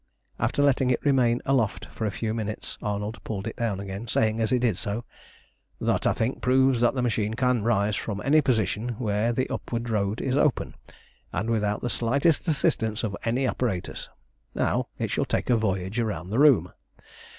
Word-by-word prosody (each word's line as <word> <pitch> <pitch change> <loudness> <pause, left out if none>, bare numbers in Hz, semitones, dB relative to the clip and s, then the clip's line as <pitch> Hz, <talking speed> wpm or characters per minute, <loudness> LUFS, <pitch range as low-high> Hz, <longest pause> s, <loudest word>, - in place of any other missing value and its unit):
After 145 - +1
letting 135 -2 +3
it 125 - 0
remain 125 -4 +3
aloft 125 -6 +1
for 110 - -2
a - - +1
few 110 +2 -3
minutes 110 -1 -4
Arnold 105 +1 -3
pulled 100 -3 -4
it 115 - -4
down 110 -5 -1
again, 100 +3 -6
saying 110 0 +1
as 110 -1 +1
he 125 - +3
did 120 -5 +1
so 105 +3 -3 0.7
"That, - - +1
I - - +3
think, 115 +4 -2
proves 130 -1 +3
that 120 +2 +3
the 125 - 0
machine 110 -2 0
can 125 -1 +2
rise 105 -2 +2
from 100 -1 -3
any 155 +3 +5
position 115 - 0
where 110 0 0
the 130 +2 0
upward 115 0 -3
road 105 0 0
is 130 - -1
open, 145 -1 +1 0.6
and 110 +5 -1
without 105 -2 0
the 120 - -2
slightest 140 +10 +1
assistance 110 -7 +1
of 105 -3 -2
any 120 +4 +1
apparatus. 115 -9 -2 0.5
Now - - 0
it - - -2
shall - - 0
take - - -1
a - - +6
voyage 100 -1 -1
round 95 -6 -2
the 115 - +1
room. 125 - +5
115 Hz, 185 wpm, -26 LUFS, 105-125 Hz, 0.7 s, a